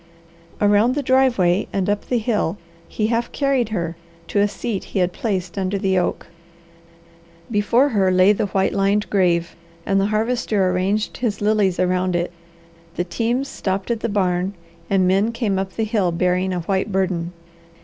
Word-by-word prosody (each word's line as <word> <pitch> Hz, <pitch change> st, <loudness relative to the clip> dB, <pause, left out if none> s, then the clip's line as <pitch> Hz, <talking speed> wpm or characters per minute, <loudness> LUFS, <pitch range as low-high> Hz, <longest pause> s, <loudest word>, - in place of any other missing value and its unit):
Around 210 Hz, +4 st, +3 dB
the 290 Hz, -, -1 dB
driveway 240 Hz, -9 st, +3 dB
and 195 Hz, -2 st, -1 dB
up 205 Hz, 0 st, -1 dB
the 250 Hz, -, +2 dB
hill 210 Hz, -5 st, -1 dB, 0.3 s
he 215 Hz, -, -2 dB
half 230 Hz, +1 st, -1 dB
carried 275 Hz, -5 st, 0 dB
her, 170 Hz, -5 st, -3 dB, 0.3 s
to 205 Hz, -, +1 dB
a 205 Hz, -, +4 dB
seat 205 Hz, -1 st, -4 dB
he -, -, -6 dB
had 180 Hz, -1 st, +1 dB
placed 190 Hz, -4 st, -3 dB
under 190 Hz, +1 st, -1 dB
the 190 Hz, -1 st, +1 dB
oak. 175 Hz, -, -2 dB, 1.3 s
Before 230 Hz, +6 st, +3 dB
her 200 Hz, -6 st, +2 dB
lay 185 Hz, +2 st, +5 dB
the 205 Hz, -, -1 dB
white 190 Hz, 0 st, 0 dB
lined 200 Hz, +1 st, +1 dB
grave, 170 Hz, -4 st, +1 dB, 0.3 s
and 195 Hz, 0 st, +2 dB
the 195 Hz, -, +1 dB
Harvester 215 Hz, -3 st, 0 dB
arranged 195 Hz, +4 st, -1 dB
his 225 Hz, -5 st, -2 dB
lilies 205 Hz, -3 st, +1 dB
around 185 Hz, 0 st, +1 dB
it. 175 Hz, 0 st, -1 dB, 0.6 s
The 175 Hz, -, 0 dB
teams 235 Hz, +9 st, -1 dB
stopped 195 Hz, -4 st, -3 dB
at 230 Hz, -, -1 dB
the 230 Hz, -, -2 dB
barn 185 Hz, -1 st, 0 dB, 0.3 s
and 190 Hz, -2 st, +3 dB
men 195 Hz, +5 st, +2 dB
came 215 Hz, -5 st, -1 dB
up 190 Hz, -1 st, -4 dB
the 225 Hz, -, -1 dB
hill 210 Hz, -5 st, +1 dB
bearing 180 Hz, +2 st, 0 dB
a 180 Hz, -1 st, -2 dB
white 190 Hz, +4 st, -1 dB
burden. 185 Hz, -3 st, -1 dB
195 Hz, 170 wpm, -21 LUFS, 185-220 Hz, 1.3 s, lay